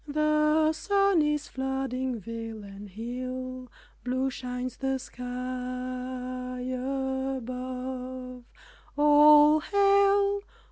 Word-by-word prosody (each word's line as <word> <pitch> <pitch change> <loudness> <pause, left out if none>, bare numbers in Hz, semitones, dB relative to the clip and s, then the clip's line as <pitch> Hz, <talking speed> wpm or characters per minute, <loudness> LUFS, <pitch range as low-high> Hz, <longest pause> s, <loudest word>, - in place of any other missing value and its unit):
The 305 +1 +3
sun 395 0 +2
is 300 -1 0
flooding 260 -2 -2
vale 225 +1 -7
and 200 +1 -10
hill, 255 +4 -6 0.3
Blue 260 +2 -1
shines 250 0 -5
the 270 0 -1
sky 250 -1 -11 1.4
above, 255 -1 -4 0.5
"All 295 +1 +7
Hail!" 400 +2 +3
265 Hz, 80 wpm, -28 LUFS, 250-300 Hz, 1.4 s, All